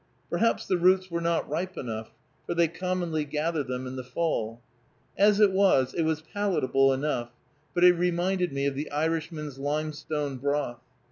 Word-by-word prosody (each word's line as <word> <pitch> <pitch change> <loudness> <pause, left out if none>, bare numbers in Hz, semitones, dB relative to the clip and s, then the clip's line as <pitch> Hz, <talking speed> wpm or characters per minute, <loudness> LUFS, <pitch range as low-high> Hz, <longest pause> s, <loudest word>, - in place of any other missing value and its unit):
Perhaps 230 - +1
the 185 - +1
roots 185 +1 +3
were 170 0 -1
not 170 0 0
ripe 180 +5 -3
enough, 110 -3 -5 0.3
for 175 - -2
they 170 0 +4
commonly 175 -2 -2
gather 150 +2 -1
them 130 -1 -4
in 130 +1 -6
the 130 - -4
fall. 125 -5 -2 0.6
As 205 +1 +4
it 210 -2 +6
was, 190 -10 +3
it - - 0
was 160 -1 0
palatable 160 -8 +2
enough, 130 -3 -1 0.5
but 175 - +2
it 180 0 +9
reminded 180 0 0
me 140 0 -1
of 140 - +1
the 145 +3 -4
Irishman's 155 -2 -2
limestone 150 -1 -2
broth. 140 -2 -1
155 Hz, 165 wpm, -27 LUFS, 140-175 Hz, 0.6 s, it